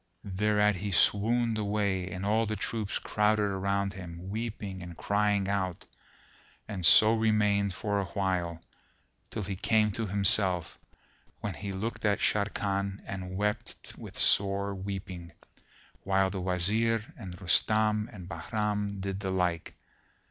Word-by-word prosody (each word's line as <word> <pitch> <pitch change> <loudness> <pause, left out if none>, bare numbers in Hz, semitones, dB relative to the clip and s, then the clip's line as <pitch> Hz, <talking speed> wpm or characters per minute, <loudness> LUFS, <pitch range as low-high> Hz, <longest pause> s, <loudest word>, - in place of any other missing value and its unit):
Thereat 105 +1 +2
he 100 +2 -3
swooned 115 +4 +3
away 100 -3 0
and 95 +2 -5
all 110 +2 +2
the 110 - -2
troops 105 0 -2
crowded 105 0 +1
around 100 0 0
him, 90 0 -8
weeping 105 -4 -4
and 85 -1 -9
crying 100 -1 +1
out, 95 -3 -2 0.8
and 100 -4 -5
so 110 +6 +7
remained 105 -3 +2
for 100 0 -1
a 100 - -1
while, 90 -2 -1 0.7
till 110 - -4
he 95 0 -3
came 105 +2 +2
to 110 +2 -3
himself, 95 -3 +1 0.6
when 100 - -3
he 100 +3 -5
looked 110 +4 -4
at 105 -2 +3
Sharrkan 100 -1 -1
and 95 -1 -5
wept 105 +1 -3
with - - -10
sore 100 0 +3
weeping, 95 -3 -6 0.7
while 95 0 +2
the 95 -1 -4
Wazir 105 +5 +1
and 90 -6 -9
Rustam 105 +3 +2
and 95 -6 -10
Bahram 105 -1 -2
did 95 0 -3
the 95 -1 -3
like. 90 -3 -1
100 Hz, 135 wpm, -29 LUFS, 95-105 Hz, 0.8 s, so